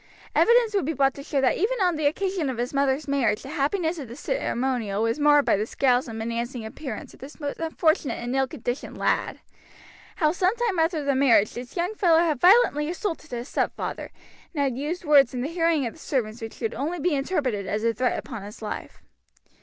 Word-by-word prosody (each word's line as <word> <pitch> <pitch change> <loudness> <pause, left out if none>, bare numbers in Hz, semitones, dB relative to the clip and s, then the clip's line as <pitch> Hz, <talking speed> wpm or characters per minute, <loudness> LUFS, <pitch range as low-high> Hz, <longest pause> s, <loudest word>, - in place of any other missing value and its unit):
Evidence 470 -2 +4
would 395 -8 +1
be 320 - -1
brought 270 -1 +2
to 280 - -9
show 280 0 -1
that 260 - +2
even 455 +6 0
on 360 -3 +2
the 305 -1 +1
occasion 370 -1 -1
of 255 - -4
his 245 +3 -3
mother's 275 +1 +1
marriage 270 -6 +1
the 270 - -8
happiness 320 +4 -1
of 275 - -6
the 235 - -9
ceremonial 245 - -1
was 230 +5 0
marred 295 -1 +5
by - - +4
the 210 +2 -2
scowls 255 -1 +2
and 225 -1 -6
menacing 235 +1 -3
appearance 225 0 -7
of - - -17
this 280 +5 -11
most 285 -2 -4
unfortunate 315 -5 +1
and 240 +2 -4
ill 270 0 +2
conditioned 250 -2 -5
lad; - - 0 0.7
how 305 -3 +2
some 365 +4 +1
time 460 -7 0
after 320 -1 +1
the 280 0 +1
marriage 255 -6 +4
this 245 +7 -8
young 355 +5 0
fellow 350 -6 +4
had 325 -5 +1
violently 355 -7 +5
assaulted 345 -3 -4
his 240 +1 -5
stepfather, - - -3 0.5
and 285 - +1
had 265 -3 0
used 310 +7 -4
words 280 -4 +5
in 245 - -2
the 265 - -1
hearing 330 -4 +1
of 230 - -4
the - - -17
servants 235 -7 -2
which 225 0 -7
could 225 - -2
only 315 +8 -3
be 345 +2 +1
interpreted 270 - -1
as 215 +1 -2
a 230 0 +2
threat 250 +3 0
upon 225 -4 -6
his 205 +3 -10
life. 210 - -6
280 Hz, 215 wpm, -25 LUFS, 245-330 Hz, 0.7 s, marred